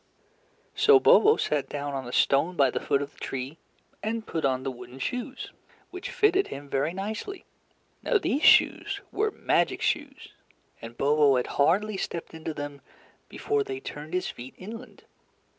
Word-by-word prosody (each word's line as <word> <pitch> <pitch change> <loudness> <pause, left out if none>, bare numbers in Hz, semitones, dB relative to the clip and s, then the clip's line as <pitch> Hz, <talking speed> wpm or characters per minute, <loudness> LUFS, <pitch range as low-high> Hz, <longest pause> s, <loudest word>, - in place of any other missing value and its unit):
So 430 -1 +6
Bobo 435 +2 +6
sat 150 -2 -1
down 145 -1 -4
on 135 -2 -4
a - - -6
stone 140 +8 +2
by 140 -5 +4
the - - -2
foot 140 0 0
of 145 +1 -9
the - - -21
tree, 135 +4 -5 0.4
and 220 +1 -3
put 160 - -3
on 130 -1 0
the 135 - -2
wooden 125 0 -11
shoes, 250 - -4 0.4
which 365 0 -6
fitted 395 -2 +2
him 140 +1 -8
very 140 +3 0
nicely. 215 - -5 0.6
Now 475 - +2
these 295 -7 -1
shoes 405 +4 +4
were 430 +2 +1
magic - - 0
shoes, - - -2 0.5
and 115 +1 -10
Bobo 145 -1 +4
had 125 - +1 0.2
hardly 195 +7 +2
stepped 170 -3 -5
into 160 0 -5
them 145 -1 -6 0.5
before 430 0 -1
they 400 -1 -5
turned 155 - -7
his 180 - -1
feet 125 +2 -9
inland. 220 +5 -10
160 Hz, 165 wpm, -27 LUFS, -, 0.6 s, So